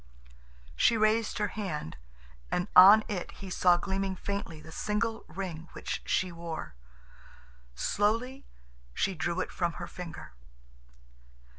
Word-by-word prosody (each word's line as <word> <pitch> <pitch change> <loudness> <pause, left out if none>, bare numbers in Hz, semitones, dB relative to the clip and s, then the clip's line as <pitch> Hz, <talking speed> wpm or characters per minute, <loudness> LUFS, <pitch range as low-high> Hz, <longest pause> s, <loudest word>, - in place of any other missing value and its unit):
She 225 - +4
raised 215 +1 +2
her 210 -1 0
hand, 165 - -4 0.5
and 180 - -1
on 200 +4 +10
it 190 -4 -4
he 195 -2 -9
saw 175 -1 +4
gleaming 190 +1 -2
faintly 200 -5 -4
the 155 +1 -12
single 220 +5 -2
ring 170 -1 -6
which - - -4
she 185 -1 +1
wore. 165 - -6 1.0
Slowly 230 - 0 0.5
she 195 - +1
drew 175 +1 -1
it - - -4
from 175 -2 -1
her 175 - -6
finger. 175 - -8
190 Hz, 125 wpm, -30 LUFS, 170-210 Hz, 1.0 s, on